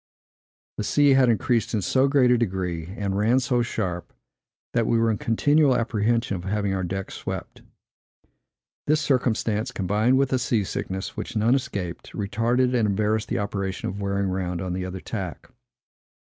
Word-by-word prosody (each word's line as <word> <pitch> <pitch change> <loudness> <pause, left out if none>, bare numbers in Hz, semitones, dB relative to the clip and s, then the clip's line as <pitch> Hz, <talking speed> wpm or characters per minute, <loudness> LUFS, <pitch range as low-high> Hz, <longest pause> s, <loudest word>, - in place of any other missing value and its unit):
The - - -2
sea 145 +6 +4
had 130 -2 +5
increased 115 +1 +1
in 105 - -1
so 130 +8 +3
great 135 -3 +4
a 125 - +5
degree, 90 -6 -2
and 100 -2 -2
ran 110 +6 +3
so 125 -1 +1
sharp, 95 -7 -3 0.6
that 115 -1 +1
we 115 - +3
were 115 0 +3
in 105 - -2
continual 145 +4 +3
apprehension 115 -1 0
of 85 - -8
having 100 0 -1
our 95 - -1
decks 95 +2 -4
swept. - - -6 1.3
This 155 +1 +3
circumstance, 120 -6 0
combined 105 +7 +1
with 135 -1 +2
the 130 - +1
sea 120 -5 +1
sickness, 95 0 -4
which - - -6
none 110 +3 +3
escaped, 100 -11 -3
retarded 120 +5 +1
and 115 -4 +2
embarrassed 105 +2 0
the - - -1
operation 100 -2 -3
of 100 +2 -6
wearing 100 0 0
round 90 -2 -2
on 90 0 -3
the 90 0 -3
other 95 0 -6
tack. 95 -6 -6
110 Hz, 170 wpm, -24 LUFS, 95-125 Hz, 1.3 s, had